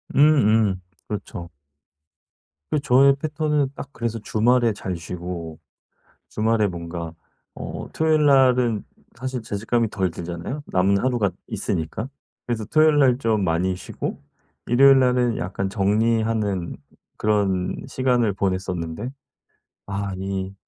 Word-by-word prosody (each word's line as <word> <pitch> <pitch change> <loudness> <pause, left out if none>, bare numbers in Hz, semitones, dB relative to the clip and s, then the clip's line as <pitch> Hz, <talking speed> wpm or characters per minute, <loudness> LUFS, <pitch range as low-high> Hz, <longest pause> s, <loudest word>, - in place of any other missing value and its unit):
음음. 110 -10 +4 0.3
그렇죠. 100 -4 -6 1.2
그 150 - +2
저의 140 0 +5
패턴은 150 -1 0
딱 140 - -7
그래서 115 -3 -3
주말에 115 +2 +2
잘 95 -2 -4
쉬고 85 -1 -6 0.7
주말에 110 0 +2
뭔가 85 -2 -5 0.4
어 - - -6
토요일 155 -1 +3
날은 125 -5 +4 0.3
사실 130 +1 -4
죄책감이 115 +2 -1
덜 95 -4 0
들잖아요 85 - -5
남은 95 +2 +2
하루가 120 -4 +1 0.2
있으니까. 95 +9 -3 0.4
그래서 115 -3 -2
토요일 155 +4 +4
날 130 -4 +5
좀 110 -6 +1
많이 90 +2 0
쉬고 - - -5 0.5
일요일 135 +3 +6
날은 125 -3 +2
약간 95 +1 -3
정리하는 105 -2 0 0.4
그런 100 -4 +1
시간을 125 -4 +1
보냈었는데 95 +1 -2 0.8
아 100 0 -3
이 95 0 -4
110 Hz, 255 characters per minute, -23 LUFS, 95-125 Hz, 1.2 s, 일요일